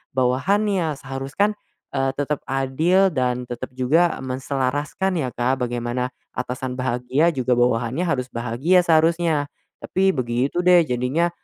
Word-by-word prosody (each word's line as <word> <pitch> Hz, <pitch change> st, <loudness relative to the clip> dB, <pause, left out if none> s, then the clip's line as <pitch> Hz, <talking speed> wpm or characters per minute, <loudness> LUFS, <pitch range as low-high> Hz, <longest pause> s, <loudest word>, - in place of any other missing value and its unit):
bawahannya, 165 Hz, +7 st, +1 dB
seharus 135 Hz, 0 st, -7 dB
kan, 205 Hz, +1 st, +3 dB, 0.4 s
eee, 135 Hz, -1 st, +1 dB
tetap 145 Hz, 0 st, -1 dB
adil 155 Hz, +9 st, +2 dB
dan 125 Hz, -2 st, 0 dB
tetap 120 Hz, +1 st, -5 dB
juga 150 Hz, +8 st, +3 dB
menselaraskan 140 Hz, +7 st, -2 dB
ya 130 Hz, -, -2 dB
Kak, 130 Hz, +2 st, 0 dB
bagaimana 120 Hz, +1 st, -2 dB, 0.2 s
atasan 125 Hz, 0 st, -4 dB
bahagia 130 Hz, +5 st, +1 dB
juga 130 Hz, -3 st, +1 dB
bawahannya 120 Hz, +6 st, +1 dB
harus 130 Hz, -6 st, 0 dB
bahagia 125 Hz, +10 st, +2 dB
seharusnya. 165 Hz, -2 st, +3 dB, 0.4 s
Tapi 190 Hz, +1 st, +1 dB
begitu 130 Hz, +6 st, -1 dB
deh, 180 Hz, -1 st, +7 dB
jadinya 125 Hz, +8 st, 0 dB
135 Hz, 125 wpm, -22 LUFS, 125-165 Hz, 0.4 s, deh